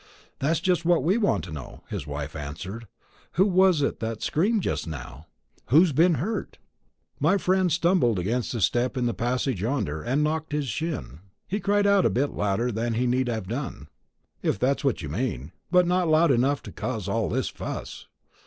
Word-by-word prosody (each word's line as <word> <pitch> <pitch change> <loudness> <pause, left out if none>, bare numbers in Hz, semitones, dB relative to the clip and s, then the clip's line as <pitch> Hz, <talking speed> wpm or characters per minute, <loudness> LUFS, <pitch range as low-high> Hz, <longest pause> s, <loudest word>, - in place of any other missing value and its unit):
"That's 155 +4 +1
just 175 -1 +1
what 170 -4 +3
we 190 +9 +2
want 110 - +1
to 85 - -8
know," 75 -5 -8
his 70 - -5
wife 75 +1 -5
answered. 90 +10 -6 0.5
"Who 190 - +4
was 185 -5 +4
it - - -1
that 115 -1 -4
screamed 200 +6 +1
just - - -2
now? 70 0 -8 0.4
Who's 160 +7 +5
been 165 +4 +4
hurt?" 200 - -3 0.6
"My 165 +7 +3
friend 185 -1 +2
stumbled 165 - +3
against 115 +8 -1
a 115 - -2
step 120 +6 +1
in 125 - 0
the 120 - 0
passage 125 -3 -1
yonder, 105 - -1
and 135 - 0
knocked 155 0 -1
his 150 -2 -1
shin. 150 - -4 0.3
He 205 - -2
cried 205 0 +2
out 200 -2 +5
a - - +1
bit 140 +3 0
louder 105 +5 0
than 115 +1 -1
he 125 +2 +1
need 125 +1 +1
have 110 -5 -3
done, 130 +6 -5 0.5
if - - 0
that's 135 +7 +1
what 135 -10 0
you 75 - -5
mean, 80 - -3 0.2
but 180 0 +5
not 180 0 +1
loud 155 0 +4
enough 135 +3 +2
to - - -8
cause 110 -7 -4
all 105 +1 0
this - - -1
fuss. - - -7
130 Hz, 190 wpm, -26 LUFS, 110-170 Hz, 0.6 s, Who's